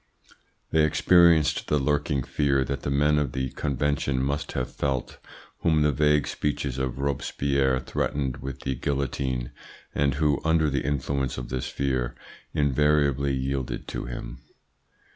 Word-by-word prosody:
They 80 -1 +4
experienced 85 0 +4
the 75 - +2
lurking 75 -1 0
fear 70 -1 +1
that 70 +1 -3
the - - -3
men 75 +2 +3
of 70 -4 -2
the 65 -1 -2
Convention 70 -1 -1
must 70 +2 -2
have 65 - -3
felt 65 -3 -2 0.4
whom 80 -2 +3
the 75 - +3
vague 75 +1 +3
speeches 70 -3 -2
of 65 -1 -2
Robespierre 70 -1 0
threatened 65 0 -2
with 65 0 -7
the 65 - -1
guillotine, 65 -2 -2 0.4
and 70 -2 +1
who, 75 -2 +1
under 80 -2 +2
the 70 -1 0
influence 70 -1 -1
of 60 -1 -6
this 65 0 -3
fear, 65 -3 -1 0.4
invariably 70 -1 +2
yielded 65 -1 -3
to - - -4
him. - - -7
70 Hz, 140 wpm, -26 LUFS, 65-75 Hz, 0.4 s, They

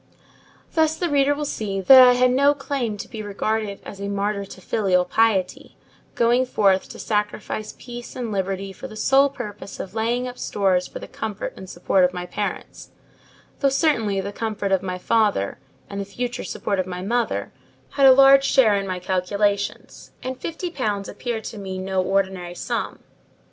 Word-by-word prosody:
Thus, 315 -1 +2
the 350 -3 -1
reader 285 0 +3
will 295 0 -3
see 205 -8 -3
that 260 +8 +9
I 250 - +6
had 250 0 +3
no 280 +3 +4
claim 270 -6 -3
to - - -7
be 220 -2 -7
regarded 205 0 -2
as 195 - -9
a 200 - -3
martyr 200 0 -1
to 190 - -12
filial 185 -2 +1
piety, 200 -2 0 0.4
going 240 +2 +3
forth 195 -5 +2
to - - -9
sacrifice 210 0 -3
peace 240 -1 -9
and 240 -3 -4
liberty 195 0 -3
for - - -8
the 215 - -11
sole 270 +6 +4
purpose 210 -7 -8
of 185 - -6
laying 235 +3 -1
up 250 0 -8
stores 185 -3 +1
for - - -9
the - - -8
comfort 215 -3 -5
and 190 - -10
support 180 +2 +1
of 180 0 +2
my 180 0 -4
parents: - - -5 0.7
though 275 - +3
certainly 235 -8 +1
the 200 +1 -4
comfort 210 -3 -3
of 190 -1 +3
my 185 -1 -4
father, 205 - +1 0.3
and 200 0 -5
the - - -4
future 245 +5 -4
support 200 -2 -2
of 185 - -1
my 180 0 -5
mother, 235 +4 -1 0.4
had 275 -1 +5
a - - +10
large 275 +1 +7
share 255 -6 +4
in 195 -1 -2
my 185 -1 -2
calculations; 200 +3 -2
and 255 0 -5
fifty 340 +4 -4
pounds 210 - -2
appeared 235 -3 -4
to 215 - -7
me 190 -1 -5
no 190 0 -1
ordinary 190 -2 -1
sum. - - -4
210 Hz, 185 wpm, -23 LUFS, 195-250 Hz, 0.7 s, a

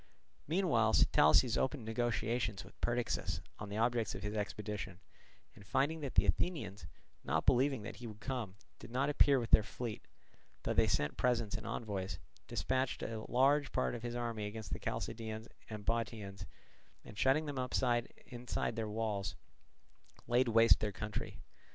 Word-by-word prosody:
Meanwhile 145 - +3
Sitalces 80 - +5
opened 130 -3 -1
negotiations 115 -2 -1
with - - -17
Perdiccas 120 0 0 0.2
on 105 - -6
the 100 - -4
objects 115 -1 +1
of 95 - -6
his 105 0 -3
expedition; 105 -3 -4 0.5
and - - -14
finding 140 +9 +1
that 140 -4 -5
the - - +5
Athenians, 105 - -1 0.4
not 75 +4 0
believing 130 -2 +3
that - - -7
he 120 - -7
would 105 -1 -9
come, 115 -6 -4 0.2
did - - -10
not 135 +4 +1
appear 140 -2 +5
with 115 -2 -4
their - - +8
fleet, 110 +1 -6 0.6
though - - 0
they - - +4
sent 75 - 0
presents 115 -4 +1
and 110 - -5
envoys, 95 -5 -3 0.3
dispatched 130 0 -1
a 110 -1 -3
large 140 +3 +3
part - - 0
of 120 - -5
his 120 0 -4
army 115 -3 -2
against 110 +1 -6
the - - -3
Chalcidians 110 0 -4 0.2
and 105 -2 -6
Bottiaeans, 110 -4 -2 0.6
and - - -10
shutting 135 +8 +3
them 145 -3 -3
up 125 -1 -2 0.6
inside 120 -1 -2
their 110 -2 -2
walls 105 -3 -2 0.9
laid 120 +1 +3
waste 115 0 +6
their 105 -1 -1
country. 105 +2 -5
115 Hz, 160 wpm, -35 LUFS, 105-125 Hz, 0.9 s, their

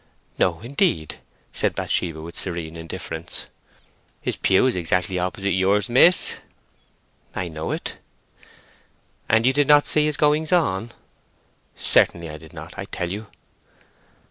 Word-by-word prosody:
"No, 85 -1 +1
indeed," 130 - 0 0.3
said - - 0
Bathsheba, 80 -3 -1
with 85 +1 -9
serene 85 -3 -4
indifference. 80 0 -6 0.7
"His - - -3
pew 95 +6 +3
is 130 - +2
exactly 90 +1 0
opposite 95 +2 -1
yours, 95 +3 +2
miss." 165 +9 +5 1.0
"I 90 - -2
know 80 -1 -5
it." - - -4 1.3
"And 110 +1 +4
you 130 - +4
did 145 0 +2
not 145 0 +6
see 150 -1 +2
his 150 -2 0
goings 150 +1 +2
on!" 120 - +1 0.9
"Certainly 85 -2 +2
I 75 - -7
did 80 0 -14
not, - - -9
I - - -4
tell 90 -1 -4
you." 105 +2 -5
95 Hz, 135 wpm, -23 LUFS, 85-130 Hz, 1.3 s, not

